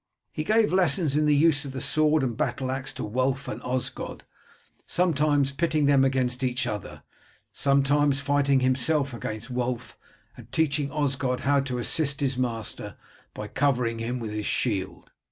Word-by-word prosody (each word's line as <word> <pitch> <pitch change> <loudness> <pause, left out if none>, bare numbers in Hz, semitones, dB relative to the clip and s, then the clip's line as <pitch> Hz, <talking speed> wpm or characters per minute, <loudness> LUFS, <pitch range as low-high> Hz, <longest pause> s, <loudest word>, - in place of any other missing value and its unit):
He 155 - -3
gave 215 +1 +2
lessons 165 -5 +2
in 150 0 +2
the 150 - +4
use 150 -1 +3
of 140 -2 -7
the 135 - -4
sword 155 +1 +2
and 120 -3 -1
battle 130 +3 -2
axe 135 +1 -3
to - - -6
Wulf 130 +5 -1
and - - -5
Osgod, 125 -1 -4 0.6
sometimes 150 -5 +2
pitting 155 +1 +1
them 140 -1 +5
against 130 -1 0
each 125 0 0
other, 90 -10 -6 0.5
sometimes 140 0 +2
fighting 140 -1 +2
himself 130 +2 +1
against 110 +1 -6
Wulf, 125 -1 -3 0.4
and - - -14
teaching 150 -2 +1
Osgod 135 -4 -1
how 140 +1 +3
to 135 -2 -3
assist 140 +3 0
his 135 -2 0
master 120 -3 -3 0.4
by 105 - -5
covering 125 -2 0
him 120 +2 -2
with 115 -3 -5
his 105 -1 -3
shield. 100 -6 -2
135 Hz, 160 wpm, -26 LUFS, 125-145 Hz, 0.6 s, them